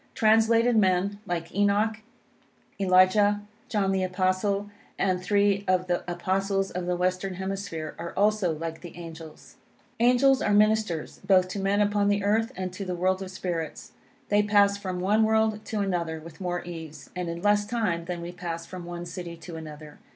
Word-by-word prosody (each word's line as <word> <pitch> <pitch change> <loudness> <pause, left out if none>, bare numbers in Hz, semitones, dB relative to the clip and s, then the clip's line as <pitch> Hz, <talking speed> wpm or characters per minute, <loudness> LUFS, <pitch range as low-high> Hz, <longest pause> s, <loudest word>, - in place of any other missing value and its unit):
Translated 225 +2 +4
men, 195 0 +2
like 170 -1 -3
Enoch, 205 +2 +2 0.8
Elijah, 195 +2 +4 0.3
John 200 -4 +1
the 190 -1 +1
Apostle, 185 +2 0 0.3
and 185 -2 +1
three 200 +1 +2
of 185 -1 +2
the 175 -1 -1
Apostles 195 +2 -1
of 180 -1 -4
the 180 - +1
Western 185 +1 -1
Hemisphere, 190 -4 -4
are 170 0 -5
also 205 -3 +2
like 165 0 -5
the 175 -1 -10
angels. 165 -2 -11 0.4
Angels 250 +3 +4
are 205 - +2
ministers, 215 -6 +1
both 185 -1 +4
to 200 - -4
men 195 +1 +1
upon 205 0 +2
the 205 0 +1
earth, 220 +4 +1
and 185 -1 -4
to 195 - -5
the 180 -2 -3
world 185 +2 +1
of 190 - -5
spirits. 170 -4 -4 0.4
They 205 0 +4
pass 205 -1 +4
from 185 -3 -4
one 205 +4 +3
world 220 -1 +2
to 215 -2 -2
another 170 -5 -1
with 165 +2 -12
more 175 -1 -2
ease, 160 -4 -9
and 180 -1 -3
in 170 +1 -5
less 205 0 +3
time 205 -8 -1
than 175 -1 -4
we 170 - -5
pass 170 -2 -5
from 180 -1 -8
one 175 0 -6
city 170 0 -7
to 165 +1 -9
another. 155 -1 -10
185 Hz, 175 wpm, -27 LUFS, 175-205 Hz, 0.8 s, Translated